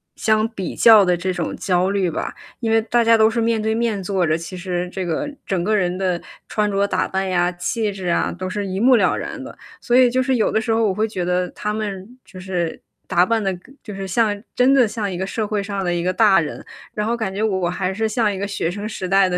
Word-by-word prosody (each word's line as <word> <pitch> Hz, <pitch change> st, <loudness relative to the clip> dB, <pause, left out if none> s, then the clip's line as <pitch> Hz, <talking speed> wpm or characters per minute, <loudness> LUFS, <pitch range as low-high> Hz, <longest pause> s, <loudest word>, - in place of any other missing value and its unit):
相 215 Hz, 0 st, +2 dB
比 195 Hz, -6 st, -5 dB
较 220 Hz, -3 st, +7 dB
的 180 Hz, -1 st, +2 dB
这 185 Hz, +2 st, -2 dB
种 175 Hz, -2 st, -3 dB
焦 185 Hz, 0 st, +1 dB
虑 195 Hz, -3 st, +1 dB
吧。 155 Hz, -, -4 dB, 0.3 s
因 225 Hz, -2 st, -1 dB
为 225 Hz, 0 st, +4 dB
大 235 Hz, +1 st, +2 dB
家 230 Hz, 0 st, +5 dB
都 220 Hz, 0 st, +5 dB
是 230 Hz, +1 st, -1 dB
面 225 Hz, -1 st, +1 dB
对 220 Hz, +1 st, 0 dB
面 225 Hz, -4 st, -1 dB
坐 190 Hz, -1 st, 0 dB
着， 155 Hz, 0 st, +1 dB
其 170 Hz, +3 st, -8 dB
实 180 Hz, -1 st, -3 dB
这 190 Hz, -2 st, -4 dB
个 290 Hz, -, -2 dB, 0.2 s
整 190 Hz, -3 st, -1 dB
个 215 Hz, +3 st, +1 dB
人 180 Hz, -3 st, 0 dB
的 185 Hz, -2 st, -1 dB, 0.3 s
穿 210 Hz, -1 st, 0 dB
着 200 Hz, 0 st, +1 dB
打 185 Hz, -1 st, 0 dB
扮 190 Hz, 0 st, -2 dB
呀、 180 Hz, -1 st, +1 dB
气 210 Hz, +4 st, -2 dB
质 190 Hz, -2 st, -6 dB
啊， 170 Hz, -, +1 dB
都 185 Hz, +1 st, -5 dB
是 205 Hz, +1 st, -3 dB
一 190 Hz, +1 st, -3 dB
目 250 Hz, +2 st, +5 dB
了 190 Hz, -5 st, +3 dB
然 -, -, -6 dB
的。 -, -, -10 dB, 0.2 s
所 245 Hz, -, +1 dB
以 255 Hz, -1 st, +6 dB
就 255 Hz, +2 st, +1 dB
是 260 Hz, 0 st, +1 dB
有 220 Hz, -, +1 dB
的 220 Hz, -, +1 dB
时 225 Hz, +1 st, -2 dB
候 225 Hz, -1 st, +2 dB
我 190 Hz, -, 0 dB
会 215 Hz, +3 st, 0 dB
觉 185 Hz, -5 st, -3 dB
得 180 Hz, 0 st, 0 dB
他 210 Hz, 0 st, -4 dB
们 200 Hz, -3 st, -4 dB, 0.2 s
就 185 Hz, -, -12 dB
是 180 Hz, -3 st, -3 dB, 0.3 s
打 175 Hz, +1 st, +3 dB
扮 225 Hz, +1 st, 0 dB
的 195 Hz, -, +1 dB
跟 255 Hz, +10 st, -17 dB
就 210 Hz, -, -8 dB
是 195 Hz, 0 st, -5 dB
像 205 Hz, +1 st, +1 dB, 0.2 s
真 250 Hz, +2 st, +4 dB
的 250 Hz, -5 st, +5 dB
像 205 Hz, -2 st, -3 dB
一 180 Hz, -, -4 dB
个 190 Hz, -, -2 dB
社 215 Hz, +1 st, -2 dB
会 210 Hz, -1 st, -1 dB
上 200 Hz, -1 st, -3 dB
的 175 Hz, -1 st, 0 dB
一 170 Hz, -, -1 dB
个 185 Hz, +1 st, 0 dB
大 205 Hz, -2 st, +5 dB
人。 160 Hz, -, -4 dB, 0.3 s
然 210 Hz, 0 st, -2 dB
后 235 Hz, -, 0 dB
感 210 Hz, -5 st, -3 dB
觉 205 Hz, -, -3 dB
我 190 Hz, -5 st, 0 dB
还 185 Hz, +1 st, -2 dB
是 220 Hz, +2 st, -1 dB
像 215 Hz, -1 st, +1 dB
一 195 Hz, -, -5 dB
个 200 Hz, -, -3 dB
学 195 Hz, -4 st, -2 dB
生 205 Hz, +2 st, -5 dB
时 190 Hz, -4 st, -5 dB
代 195 Hz, 0 st, +5 dB
的 180 Hz, -1 st, -1 dB
200 Hz, 290 characters per minute, -21 LUFS, 185-220 Hz, 0.3 s, 较